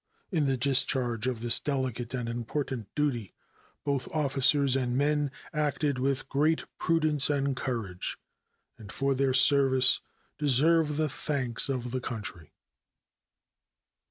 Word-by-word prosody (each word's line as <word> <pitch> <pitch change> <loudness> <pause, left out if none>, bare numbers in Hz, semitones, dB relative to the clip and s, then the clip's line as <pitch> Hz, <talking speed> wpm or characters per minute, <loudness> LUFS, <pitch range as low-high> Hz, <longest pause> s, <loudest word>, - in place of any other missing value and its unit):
In 155 -6 +1
the 135 -1 0
discharge 125 -3 +2
of 125 -3 -3
this 120 -1 +3
delicate 130 -3 -3
and 120 -2 -4
important 120 0 -4
duty 130 -9 -2 0.5
both 140 -3 -2
officers 140 -2 +2
and 125 -2 -1
men 145 0 +1 0.2
acted 150 -2 -1
with 135 +1 -1
great 155 +3 0
prudence 155 -4 +3
and 140 -2 0
courage, 115 -8 -4 0.6
and 100 -3 -10
for 135 0 0
their 135 -1 0
services 130 -1 +5 0.4
deserve 150 +2 +3
the 155 0 +1
thanks 130 -4 0
of 125 -3 -3
the 130 0 -3
country. 105 -9 -6
135 Hz, 125 wpm, -28 LUFS, 125-145 Hz, 0.6 s, services